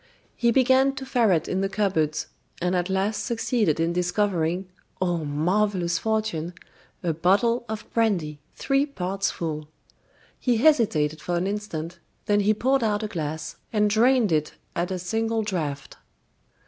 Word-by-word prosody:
He 235 - +2
began 265 +2 +4
to 265 - -6
ferret 220 - +2
in 185 - -1
the 195 - 0
cupboards, 190 -7 0 0.3
and 180 +1 0
at 180 +1 0
last 195 +3 0
succeeded 225 - 0
in 165 +1 +1
discovering 180 -1 0 0.3
oh, 175 -3 0
marvelous 175 +4 0
fortune! 215 -7 -1 0.5
a 170 -2 +1
bottle 205 +9 +2
of 220 -1 -4
brandy, 180 -10 0 0.2
three 275 +1 +1
parts 195 -6 -2
full. 155 -2 -4 0.7
He 245 -3 +1
hesitated 200 - +3
for 175 - -2
an 175 - 0
instant, 190 -5 -4 0.3
then 205 -2 +3
he 205 +1 +3
poured 260 +3 +2
out 210 -1 0
a - - -1
glass, 155 -4 -4
and 210 -1 +2
drained 235 -1 +4
it 155 -1 0 0.2
at 175 0 -1
a 185 - -2
single 225 +5 -1
draft. 155 -9 -4
195 Hz, 150 wpm, -25 LUFS, 170-225 Hz, 0.7 s, began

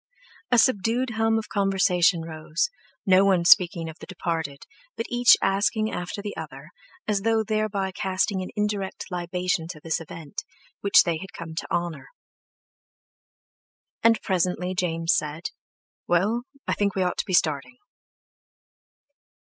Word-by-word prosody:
A 245 - +4
subdued 235 +2 +2
hum 225 0 +1
of 220 - -3
conversation 190 -3 +2
rose, 160 - -2 0.3
no 190 0 +6
one 185 -3 +3
speaking 175 -2 +5
of 160 +1 -9
the - - -10
departed, 165 -6 -4 0.3
but 230 - -2
each 245 0 +6
asking 215 +3 +1
after 180 +3 -5
the 205 - -5
other, 150 0 -9 0.4
as 205 -2 +1
though 225 +1 +2
thereby 215 -3 -1
casting 190 +1 -1
an 185 - -5
indirect 210 -2 -2
libation 180 -1 -2
to 165 -3 -8
this 165 +2 -2
event, 160 -2 -8 0.4
which 200 - +6
they 170 -2 -1
had 190 +4 -10
come 165 -1 -8
to 160 - -6
honour. 170 -4 -2 1.9
And 230 0 +4
presently 180 -1 0
James 165 -2 0
said: 155 +2 -3 0.6
"Well, 210 +8 +1 0.2
I - - +1
think 200 -1 0
we 190 - +1
ought 180 - -2
to - - 0
be 185 - -3
starting." 155 - 0
185 Hz, 140 wpm, -25 LUFS, 165-210 Hz, 1.9 s, no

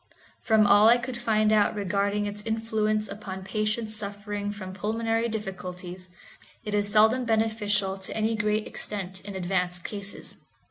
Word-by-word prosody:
From 220 -2 +4
all 205 +2 +7
I 240 - +7
could 245 +1 -5
find 215 -3 +2
out 215 0 +4
regarding 200 +1 0
its 205 0 -4
influence 215 -1 0
upon 195 -2 -7
patients 215 +3 -1
suffering 205 0 -4
from 190 -2 -7
pulmonary 225 +3 0
difficulties, 185 -3 -6 0.5
it 210 - -4
is 205 0 +1
seldom 220 +4 +5
beneficial 215 -3 +1
to 190 +2 -6
any 220 +1 +1
great 210 0 0
extent 190 -2 -4
in 200 -1 -8
advanced 180 -1 -1
cases. 200 -1 -5
210 Hz, 145 wpm, -27 LUFS, 195-220 Hz, 0.5 s, all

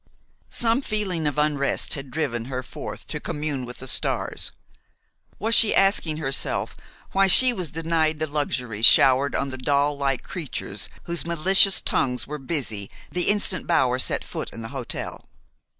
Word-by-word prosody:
Some 230 +2 0
feeling 195 - -2
of 145 - -3
unrest 150 -2 0
had 140 -2 -6
driven 125 -5 -3
her 130 0 -5
forth - - -9
to - - -5
commune 145 -4 -4
with 125 - -10
the 130 - -9
stars. - - -1 0.9
Was 225 +2 0
she 225 -2 +7
asking 195 -5 +2
herself 135 -4 -1 0.4
why 195 0 +3
she 250 +7 +8
was 180 -8 -5
denied 160 0 -1
the 155 - -2
luxuries 125 -7 +1
showered 135 +1 +4
on 140 - -2
the 130 - -7
doll 145 +2 +1
like 140 -2 -2
creatures 165 -7 -6
whose 170 -3 -2
malicious 190 +4 +5
tongues 125 -2 -1
were 150 +1 -7
busy 125 - -3 0.2
the 180 0 +1
instant 200 -4 0
Bower 125 -1 +1
set - - +1
foot - - -6
in 115 - -9
the 115 - -7
hotel? 130 -2 -6
150 Hz, 160 wpm, -23 LUFS, 130-170 Hz, 0.9 s, she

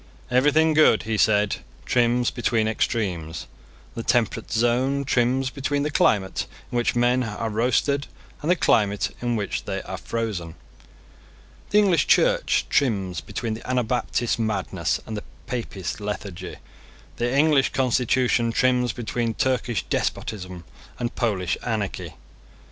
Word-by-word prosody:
Everything 150 +5 +4
good, 155 -7 +5
he 110 0 -2
said, 105 -1 +3 0.3
trims 120 0 +2
between 115 -3 0
extremes. 95 -8 -2 0.5
The 115 - -4
temperate 115 -1 0
zone 125 +5 +1
trims 130 +1 +1
between 140 +1 -1
the 150 - -1
climate 95 -8 +1 0.2
in - - -5
which 120 0 +1
men 120 +1 +3
are 110 -1 -3
roasted 130 +5 +1 0.3
and 155 - -2
the 180 - +5
climate 105 - +1
in 120 -1 0
which 105 -2 -3
they - - -2
are - - -6
frozen. 105 -8 -4 1.1
The 205 - +3
English 195 -5 +4
Church - - +3
trims 95 -10 0
between 110 +2 -4
the 115 +3 -8
Anabaptist 120 -1 0
madness 105 -4 -1
and 110 - -5
the 105 - -5 0.2
Papist 110 -8 -4
lethargy. 100 -3 -5 0.6
The 120 +1 0
English 145 -2 +4
constitution 125 -2 +2
trims 125 0 +2
between 115 -1 -2
Turkish 125 -4 0
despotism 95 -4 -3 0.3
and 120 -1 -3
Polish 95 -7 -1
anarchy. 110 -4 -3
120 Hz, 130 wpm, -24 LUFS, 105-130 Hz, 1.1 s, good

